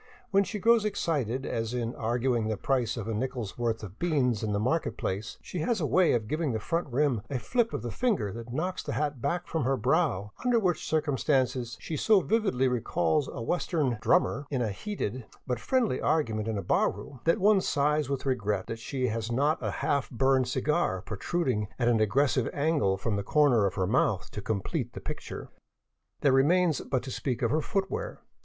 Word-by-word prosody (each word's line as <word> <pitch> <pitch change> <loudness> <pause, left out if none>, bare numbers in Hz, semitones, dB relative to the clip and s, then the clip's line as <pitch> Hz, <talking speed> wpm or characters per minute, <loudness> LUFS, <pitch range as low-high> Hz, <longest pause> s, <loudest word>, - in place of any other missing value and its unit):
When 200 0 +5
she 210 - -4
grows 230 +2 +4
excited, 140 - -1
as 115 +1 -2
in 120 -1 -2
arguing 120 0 0
the 110 -1 -1
price 125 0 0
of 110 -2 -4
a 115 - -1
nickel's 120 -2 -3
worth 115 -2 -1
of 100 0 -9
beans 135 -10 +1
in 110 -2 -1
the 100 - 0
market 145 +9 0
place, 100 +4 -3
she 180 - -5
has 220 +7 0
a 160 - 0
way 180 +4 +4
of 110 -3 0
giving 155 -1 -1
the 110 - -1
front 165 +10 -1
rim 130 -3 +1
a 140 - -1
flip 235 - 0
of - - -4
the 120 - -3
finger 205 - 0
that 115 +1 -8
knocks 180 +8 -2
the - - -4
hat 145 -4 -2
back 175 +6 -1
from 160 -3 -2
her 135 +2 +1
brow, 130 - +1
under 245 -2 +3
which 180 -6 0
circum 155 -4 0
stances 130 -4 0
she 160 - -5
so 210 +7 +4
vividly 165 - +1
recalls 125 - +1
a 115 - -6
Western 145 -5 0
" - - -23
drummer 145 -5 +2
" - - -46
in 130 -4 0
a 110 - -1
heated 130 - -4 0.2
but 125 -3 -2
friendly 240 - +1
argument 115 -9 0
in 110 -2 -1
a 100 - -3
bar - - +2
room, 115 +6 -10
that 165 +5 +4
one 205 -1 +4
sighs 150 -3 +1
with 140 -1 -2
regret 105 -7 0
that 115 - -5
she 130 +2 -2
has 115 +1 -3
not 145 +6 +2
a - - -1
half 140 -2 -1
burned 130 +1 +2
cigar 130 - 0
protruding 110 - -1
at 120 - +1
an 120 -2 +3
aggressive 130 +3 +2
angle 140 -11 +1
from 100 +1 -1
the 100 - -2
corner 125 -5 +4
of - - -4
her 95 - +1
mouth 100 -2 +1
to 105 - -5
complete 100 -1 -2
the - - -6
picture. - - -7 0.7
There 140 -3 +4
remains 160 +3 +3
but 130 -2 -2
to 130 - -6
speak 125 -1 -2
of 115 - +2
her 155 +2 +2
footwear. 205 - -3
130 Hz, 210 wpm, -28 LUFS, 115-160 Hz, 0.7 s, When